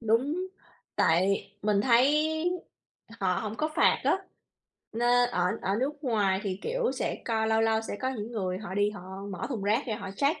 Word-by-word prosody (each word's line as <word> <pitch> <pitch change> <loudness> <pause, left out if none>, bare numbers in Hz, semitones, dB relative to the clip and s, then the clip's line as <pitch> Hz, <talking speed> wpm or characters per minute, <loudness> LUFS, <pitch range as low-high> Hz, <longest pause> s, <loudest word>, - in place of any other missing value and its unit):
Đúng, 230 +6 +2 0.6
tại 185 +5 +2
mình 205 -1 +2
thấy 300 +7 +3 0.8
họ 185 -2 +1
hổng 215 0 -4
có 310 - 0
phạt - - +4
á, - - +3 0.7
nê 245 +2 +3
ở 180 -7 0 0.2
ở 195 +1 0
nước 290 +2 -3
ngoài 205 -6 +2
thì, 190 -2 -2
kiểu, - - 0
sẽ - - -2
co 220 -1 0
lâu 220 0 +3
lâu 225 0 +3
sẽ 220 - -5
có 260 - 0
những 230 -2 -5
người 185 -5 -2
họ 190 -2 -6
đi 205 +1 +2
họ 205 -3 -9 0.3
mở 185 -1 -4
thùng 225 -7 -3
rác 215 +6 +2
ra 220 - -2
họ 195 -4 -6
check, 285 +4 +1
220 Hz, 190 wpm, -28 LUFS, 200-260 Hz, 0.8 s, phạt